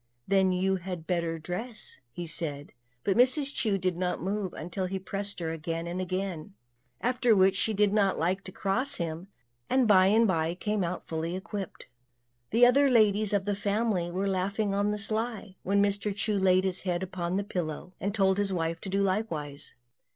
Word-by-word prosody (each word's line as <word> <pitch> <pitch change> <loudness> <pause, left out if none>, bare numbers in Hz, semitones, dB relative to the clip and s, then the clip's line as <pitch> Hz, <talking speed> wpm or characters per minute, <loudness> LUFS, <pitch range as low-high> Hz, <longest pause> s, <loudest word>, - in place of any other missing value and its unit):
"Then 190 -1 +3
you 190 +1 +1
had 180 -2 -6
better 170 -2 -1
dress," 185 +8 -6 0.3
said 150 -3 -3
he; - - -25 0.3
but 195 - +1
Mrs. 270 +3 +3
Chu 210 -4 +1
did 185 -2 -1
not 180 0 -1
move 195 +1 -2
until 180 +4 -3
he 190 +1 -3
pressed 195 +1 -4
her 165 -2 -2
again 165 +1 -4
and 175 +2 -3
again, 185 -1 -4 0.5
after 245 -2 +3
which 190 0 +4
she 220 - +1
did 205 0 +3
not 200 -3 +2
like 185 +4 0
to 185 - -7
cross 235 +10 0
him, 165 +2 -4 0.4
and 255 -2 +3
by 190 -3 +6
and 220 +3 +5
by 165 -2 0
came 210 +1 -1
out 175 +1 -3
all - - -38
fully 165 +2 -3
equipped. 195 0 -6 0.6
The 235 +3 +6
other 275 +3 +5
ladies 215 -3 +4
of 200 -2 +1
the 205 - 0
family 200 -3 0
were 190 +3 -1
laughing 195 +2 0
on 200 +1 +1
the 210 - -1
sly, 215 -1 -1
when 200 +1 +2
Mr. 200 0 0
Chu 210 +1 0
laid 185 -1 +4
his 190 -1 -1
head 180 -1 -1
upon 180 -1 -3
the 200 - 0
pillow, 180 -2 -4
and 200 - -1
told 195 -1 +2
his 200 -1 0
wife 165 -2 -2
to 195 - -6
do 195 +1 +1
likewise. 165 -8 -3
190 Hz, 195 wpm, -29 LUFS, 180-205 Hz, 0.6 s, by